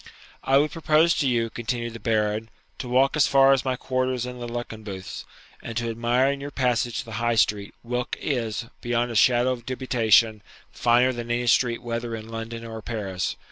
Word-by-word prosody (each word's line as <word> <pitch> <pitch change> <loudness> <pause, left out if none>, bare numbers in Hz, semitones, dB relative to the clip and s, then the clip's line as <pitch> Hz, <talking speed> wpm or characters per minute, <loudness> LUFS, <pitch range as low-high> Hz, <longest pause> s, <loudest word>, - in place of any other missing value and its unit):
'I 135 +1 +4
would 150 +2 +2
propose 165 +1 +3
to 140 - +2
you,' 115 -3 0
continued 120 0 -3
the 115 - -8
Baron,'to 110 +2 -3
walk 130 +2 +3
as 150 - +4
far 135 0 +6
as 135 - +1
my 130 -1 0
quarters 130 -1 -1
in 125 0 -7
the 120 - -5
Luckenbooths, 110 -5 -6 0.4
and 115 -1 -6
to 120 -1 -1
admire 120 +4 +2
in 140 0 -5
your 140 - -5
passage 125 -3 0
the 115 - -11
High 120 0 +1
Street, 105 -2 +1
whilk 125 +1 -3
is, 115 -6 -2 0.2
beyond 120 0 0
a - - -6
shadow 120 +3 +4
of 120 -2 -4
dubitation, 115 -4 +2 0.3
finer 120 +2 +3
than 120 -1 -6
any 120 +1 0
street 120 0 +2
whether 115 -1 -3
in 110 0 -9
London 115 0 -6
or 110 -1 -7
Paris. 100 -6 -3
120 Hz, 185 wpm, -25 LUFS, 115-130 Hz, 0.4 s, far